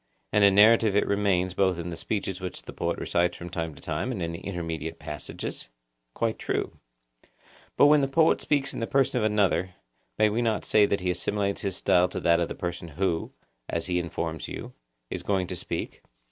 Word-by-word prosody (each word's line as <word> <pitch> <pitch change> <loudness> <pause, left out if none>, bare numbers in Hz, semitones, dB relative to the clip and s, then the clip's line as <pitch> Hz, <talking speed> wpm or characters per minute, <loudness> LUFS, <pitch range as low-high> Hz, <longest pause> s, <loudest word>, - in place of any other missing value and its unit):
And 105 0 +4
a 100 - +8
narrative 105 +1 +5
it 105 - +3
remains 95 -3 +1
both 95 -1 +2
in 85 0 -5
the - - -4
speeches 95 +2 -3
which 90 -1 -6
the - - -9
poet - - -2
recites 85 0 0
from 90 0 -8
time 80 -3 -3
to - - -14
time 130 - -2
and 115 - -4
in 85 -1 -2
the 85 - -6
intermediate 80 -4 -4
passages? 75 -3 -6 0.5
Quite 115 -1 -1
true. - - -3 1.0
But - - +7
when 150 0 +6
the 135 - +1
poet 160 +4 +3
speaks 140 -2 0
in - - -5
the 115 - -2
person 135 -2 +2
of - - -1
another, 100 -4 +1 0.4
may 110 - +5
we 110 +3 0
not 115 -2 0
say 105 -1 +4
that 100 -1 0
he 90 0 +1
assimilates 100 +3 -1
his 95 -2 -2
style 90 -1 +3
to - - -4
that 85 0 +3
of 85 - 0
the - - -6
person 85 -1 -4
who, 85 +1 -1 0.4
as 85 - -2
he 90 -1 0
informs 80 -2 -4
you, - - -7 0.4
is - - -3
going 95 -2 0
to 90 - -5
speak? - - -5
95 Hz, 210 wpm, -27 LUFS, 85-105 Hz, 1.0 s, a